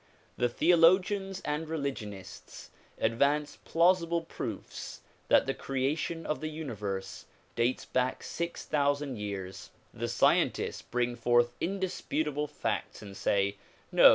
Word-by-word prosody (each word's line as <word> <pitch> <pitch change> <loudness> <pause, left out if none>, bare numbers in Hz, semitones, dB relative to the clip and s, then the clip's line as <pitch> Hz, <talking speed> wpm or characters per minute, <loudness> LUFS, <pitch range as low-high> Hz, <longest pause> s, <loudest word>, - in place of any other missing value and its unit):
The 120 - +1
theologians 185 - +4
and 150 +2 -2
religionists 130 -11 -5 0.3
advance 140 +6 +1
plausible 170 0 +3
proofs - - -6 0.3
that - - +5
the - - 0
creation 150 +5 -2
of 150 - -2
the 155 - -2
uni 155 -4 -5
verse 100 -2 -4 0.3
dates 120 +2 +1
back 130 0 0
six 170 0 -4
thousand 145 -4 0
years; 95 -2 -5 0.2
the - - -3
scientists - - +2
bring 120 0 -1
forth 120 0 +3
in 195 +3 -1
disputable 150 -5 -1
facts 110 - -3
and 100 -1 -9
say 100 +1 +1 0.3
"No! - - +9
145 Hz, 125 wpm, -30 LUFS, 120-165 Hz, 0.3 s, No